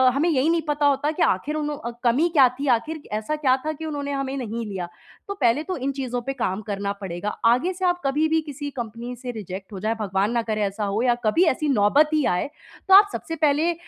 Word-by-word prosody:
हमें 300 +5 +2
यही 295 0 +2
नहीं 335 -1 +2
पता 295 0 +1
होता 285 +2 +2
कि - - -5
आखिर 285 +12 0
उनु 300 -1 -2
अ, 235 -4 -6
कमी 250 +8 +3
क्या 285 -6 +6
थी 285 - -2
आखिर 275 +8 -2
कि 295 - -16
ऐसा 220 +8 -2
क्या 275 -4 +3
था 310 - -1
कि 320 +1 -7
उन्होंने 285 -2 -3
हमें 275 -1 -2
नहीं 230 -2 -4
लिया? 185 -4 -4 0.4
तो 400 - -3
पहले 245 +4 +3
तो 370 +2 -4
इन 270 +1 -2
चीज़ों 255 -3 -3
पे 270 +3 -4
काम 215 -6 -2
करना 200 -1 -3
पड़ेगा। 185 +1 -4 0.2
आगे 250 +11 +3
से 370 +1 -3
आप 355 0 +1
कभी 295 +3 +2
भी 320 0 +2
किसी 290 +1 -5
कंपनी 235 +2 -5
से 250 +1 -6
रिजेक्ट 195 -2 -8
हो 195 - -6
जाएँ, 220 +4 -1
भगवान 195 +1 0
ना 235 -1 +1
करे, 215 -2 -2
ऐसा 200 +1 -2
हो 200 +2 -1
या 245 -1 +3
कभी 215 +12 +4
ऐसी 305 +2 -2
नौबत 270 +5 +4
ही 305 -2 +2
आए, 180 +10 0 0.4
तो 385 - +5
आप 405 +1 +9
सबसे 325 - -4
पहले 310 +2 +2
265 Hz, 245 wpm, -23 LUFS, 215-300 Hz, 0.4 s, आप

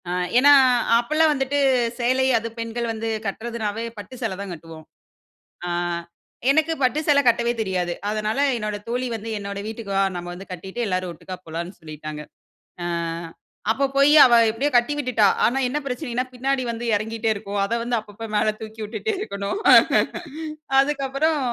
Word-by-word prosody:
ஆ - - -2 0.3
ஏன்னா 285 +3 +7 0.5
அப்போலாம் 310 +6 +2
வந்துட்டு, 275 0 0 0.4
சேலை 255 +2 +2
அது 225 0 -3
பெண்கள் 230 +1 -3
வந்து 225 0 -3 0.2
கட்டுறதுனாவே 225 +1 -3
பட்டு 205 +4 -9
சேலை 220 -5 -2
தான் 200 -2 -6
கட்டுவோம். 160 -1 -11 0.8
அ - - -3 0.8
எனக்கு 315 +3 +3
பட்டு 255 +3 +2
சேலை 285 -1 +6
கட்டவே 235 0 +3
தெரியாது. 180 -4 -1 0.2
அதனால 215 +3 -2 0.2
என்னோட 210 -2 -3
தோழி 250 +2 -1
வந்து 225 0 -5
"என்னோட 200 0 -6
வீட்டுக்கு 220 -1 -7
வா! 195 - +4
நம்ம 175 0 -6
வந்து 190 +2 -10
கட்டிட்டு 190 +6 -7
எல்லாரும் 185 -2 -1
ஒட்டுக்கா 185 +3 -8
போலான்னு 170 +3 -5
சொல்லிட்டாங்க." 155 -1 -7 0.6
அ - - -3 0.9
அப்போ 275 +5 +1
போய் 280 +2 +5
அவ 245 - +4 0.2
எப்படியோ 270 +7 -1
கட்டி 240 +4 +4
விட்டுட்டா. 250 -7 +3 0.2
ஆனா 250 - +2
என்ன 265 +4 -2
பிரச்சனைன்னா 250 -2 -2
பின்னாடி 265 +1 -1
வந்து 235 +1 -5
இறங்கிகிட்டே 225 +2 -2
இருக்கும். 200 0 -4
அத 210 - -3
வந்து 240 0 -1
அப்பப்போ 215 +1 -9
மேல 215 +1 +3
தூக்கி 220 0 -8
விட்டுட்டே 220 - -3
இருக்கணும். 200 - -3 1.2
அதுக்கப்புறம் 280 +2 +1
225 Hz, 155 wpm, -23 LUFS, 200-260 Hz, 1.2 s, ஏன்னா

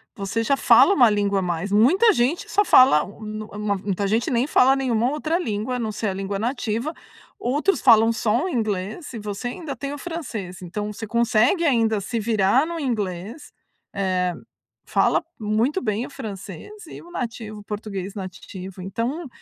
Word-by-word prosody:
você 200 +3 -2
já 275 +4 +2
fala 395 - +6
1 245 - +6
língua 205 -1 +1
a - - -1
mais. 175 +2 -2
Muita 350 - +5
gente 265 +4 0
só 410 - +3
fala, 255 - +6
hum, 205 - -12
nu 215 0 -6
mu 205 -1 0
muita 200 +1 -2
gente 220 +4 +1
nem 240 0 +2
fala 265 -2 +5
nenhuma 245 -3 +1
outra 310 +3 -1
língua, 220 - -2
a - - -2
não 220 -2 -2
ser 215 +1 -3
a - - -2
língua 195 +1 -3
nativa. 240 +3 -2 0.5
Outros 290 +11 0
falam 225 0 +6
só 230 +6 0
o 375 - -2
inglês, 215 - -3
e 230 - -5
você 205 +3 -5
ainda 285 +1 -6
tem 275 +3 -5
o - - -6
francês. 230 - -6
Então 205 +4 -5
você 220 - -6
consegue 235 - +2
ainda 225 -7 +2
se 230 +4 -3
virar 220 +4 +2
no 340 0 -4
inglês, 220 - -4 0.4
eh, 185 -2 0 0.5
fala - - +2 0.2
muito 225 - 0
bem 215 +2 -1
o - - -10
francês, 205 - -8 0.2
e - - -10
o 345 - -15
nativo 225 -6 -5
o - - -12
português 205 -2 -5
nativo. 185 -1 -8
Então, 235 - -3
220 Hz, 180 wpm, -23 LUFS, 200-260 Hz, 0.5 s, fala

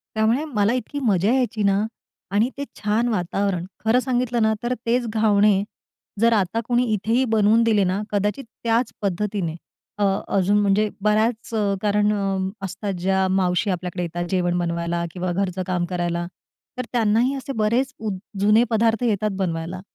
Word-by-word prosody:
त्यामुळे 225 +7 +2
मला 225 -7 +1
इतकी 255 +3 -3
मजा 205 -2 +2
यायची 245 -5 0
ना 200 +2 +2 0.4
आणि 210 +5 +2
ते 280 - -2
छान 220 +3 +1
वातावरण. 195 -3 -1 0.2
खरं 225 +3 +4
सांगितलं 245 -2 0
ना, 220 0 +3
तर 245 +1 0
तेच 240 +1 +1
घावणे 210 -2 +3 0.6
जर 230 +1 +4
आता 210 +1 +1
कोणी 245 0 +3
इथेही 225 +5 +1
बनवून 220 +1 +4
दिले 215 -3 +3
ना, 190 +3 0
कदाचित 210 +7 0 0.2
त्याच 230 +1 +1
पद्धतीने 195 -3 -2 0.4
अ, 205 - +2 0.3
अजून 195 +2 +3
म्हणजे 205 +1 +2
बऱ्याच 215 +2 +1 0.3
कारणं 205 -2 +1
असतात, 195 +2 -4
ज्या 190 +1 +1
मावशी 190 +2 +1
आपल्याकडे 180 -1 -3
येतात 175 0 -3
जेवण 175 -2 +1
बनवायला 170 0 -1
किंवा 180 -1 -2
घरचं 185 0 -1
काम 180 -2 0
करायला, 175 -1 -1 0.5
तर 255 - -2
त्यांनाही 235 +2 +2
असे 275 0 -5
बरेच 235 +5 +1
उ 220 -1 -3 0.3
जुने 210 +3 +5
पदार्थ 225 +1 +2
येतात 215 -2 +1
बनवायला. 170 -1 -3
210 Hz, 155 wpm, -22 LUFS, 185-230 Hz, 0.6 s, जुने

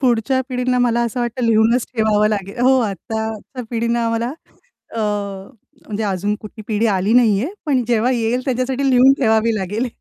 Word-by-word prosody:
पुढच्या 255 0 +1
पिढींना 250 -1 0
मला 240 -1 +2
असं 235 +1 -3
वाटतं 240 +1 -2
लिहूनच 230 +2 +3
ठेवावं 215 -2 +2
लागेल 200 0 -4
हो, 260 +1 +4
आत्ताच्या 220 +4 -5
पिढीनं 235 0 0
आम्हाला 230 0 -1 0.7
अ, - - -1 0.9
म्हणजे 215 0 -4
अजून 205 +1 -1
कुठली 215 +1 -10
पिढी 220 +1 +1
आली 200 0 +1
नाहीये, 230 -1 +4 0.2
पण 270 -4 +2
जेव्हा 235 +1 +2
येईल 235 0 0
त्याच्यासाठी 265 +1 0
लिहून 255 +1 +6
ठेवावी 220 -1 +2
लागेल. 210 +4 -2
230 Hz, 155 wpm, -19 LUFS, 215-250 Hz, 0.9 s, लिहून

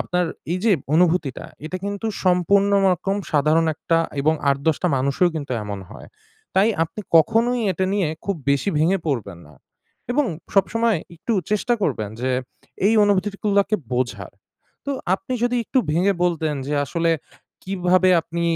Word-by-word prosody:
আপনার 180 0 0 0.3
এই 180 - 0
যে 225 - +4 0.2
অনুভূতিটা 165 -5 +1 0.2
এটা 180 +4 -4
কিন্তু 200 +2 -3 0.2
সম্পূর্ণ 190 +3 +3 0.2
রকম 195 +3 -1 0.2
সাধারণ 155 +3 +3
একটা 165 +2 0 0.2
এবং 155 +3 +3
৮, 140 - +4
১০ 160 -3 +3
টা - - +2
মানুষও 140 +7 +2
কিন্তু 145 -4 -4
এমন 100 -1 -5
হয়। - - -11 0.5
তাই 195 +4 +4 0.2
আপনি 165 - -8 0.2
কখনোই 230 +8 +3
এটা 185 +2 -1
নিয়ে 195 -6 +1 0.2
খুব 200 -2 -1
বেশি 140 +8 +1
ভেঙে 180 +5 +2
পড়বেন 105 - -2
না 75 - -17 0.6
এবং 295 +2 +2 0.3
সবসময় 220 +1 +2 0.2
একটু 230 +8 -3 0.2
চেষ্টা 225 +3 +1
করবেন 110 - -1
যে 130 - 0 0.6
এই 220 - +4
অনুভূতিগুলোকে 200 +1 +1 0.2
বোঝার। 125 -1 -2 0.5
তো 280 - -1 0.2
আপনি 225 +6 -6
যদি 245 0 +1
একটু 260 - 0
ভেঙে 185 +5 +2
বলতেন 160 -3 0
যে 145 - -1
আসলে 165 +5 0 0.5
কীভাবে 185 -1 +2
আপনি 170 +1 -4
180 Hz, 150 wpm, -22 LUFS, 155-200 Hz, 0.6 s, যে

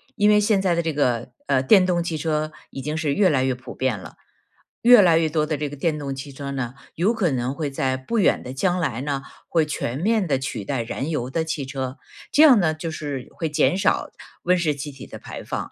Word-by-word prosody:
因 210 -2 +3
为 210 0 +6
现 210 -1 +3
在 185 -3 +2
的 170 - +1
这 165 -1 -1
个， 125 -4 0 0.2
呃， 135 -2 +3
电 185 +6 +6
动 175 -2 +1
汽 165 -2 -3
车 155 0 -1 0.2
已 135 - -6
经 150 +3 -3
是 150 -3 0
越 190 +1 +4
来 130 -4 +2
越 130 -1 +1
普 125 0 -10
遍 130 -6 -1
了， - - -11 0.7
越 240 -2 +8
来 165 -2 +5
越 160 -1 +1
多 155 -1 +1
的 155 0 -1
这 145 0 -3
个 145 - -8
电 150 +1 -1
动 140 -1 -4
汽 140 +1 -7
车 140 +1 -7
呢， 130 -2 -3 0.2
有 195 +8 +2
可 200 -7 +1
能 125 +1 -1
会 150 -1 -3
在 135 -1 -1
不 130 - -3
远 - - +3
的 125 - -7
将 180 +5 +1
来 130 -7 -1
呢， 140 -1 -2 0.3
会 160 -3 +2
全 130 -2 -3
面 215 +1 +2
地 135 -3 +1
取 115 -6 -4
代 135 -4 -1
燃 135 +6 -4
油 125 -4 -2
的 160 +4 -1
汽 160 -3 -3
车， 130 -1 -5 0.3
这 300 - +4
样 260 -8 +8
呢 160 -3 +2
就 160 +1 -5
是 145 -5 -5
会 165 - -2
减 165 +4 +2
少 195 - +1 0.3
温 180 +1 +3
室 160 -4 +1
气 145 +1 -6
体 135 - -11
的 - - -10
排 - - -8
放。 - - -5
150 Hz, 265 characters per minute, -23 LUFS, 135-170 Hz, 0.7 s, 越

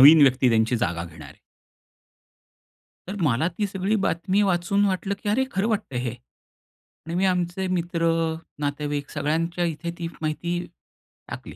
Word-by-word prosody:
नवीन 150 +3 +10
व्यक्ती 130 -1 +5
त्यांची 115 +2 +3
जागा 90 -7 -1
घेणार 80 -2 -11
आहे. - - -16 1.7
तर 190 - -4
मला 145 +2 +3
ती 210 - +1
सगळी 195 +2 0
बातमी 185 +5 +1
वाचून 195 +2 +2
वाटलं, 195 0 0
की 205 - 0
अरे! 245 +6 +3
खरं 195 +4 +1
वाटतंय 205 - -1
हे 125 -1 -2 1.0
आणि 165 - -3
मी 185 +2 +2
आमचे 180 0 0
मित्र, 170 -2 0 0.5
नातेवाईक 145 0 -2
सगळ्यांच्या 165 +3 0
इथे 170 +1 -3
तीच 170 -1 -4
माहिती 160 +3 -1 0.7
टाकली - - -7
170 Hz, 145 wpm, -25 LUFS, 145-190 Hz, 1.7 s, नवीन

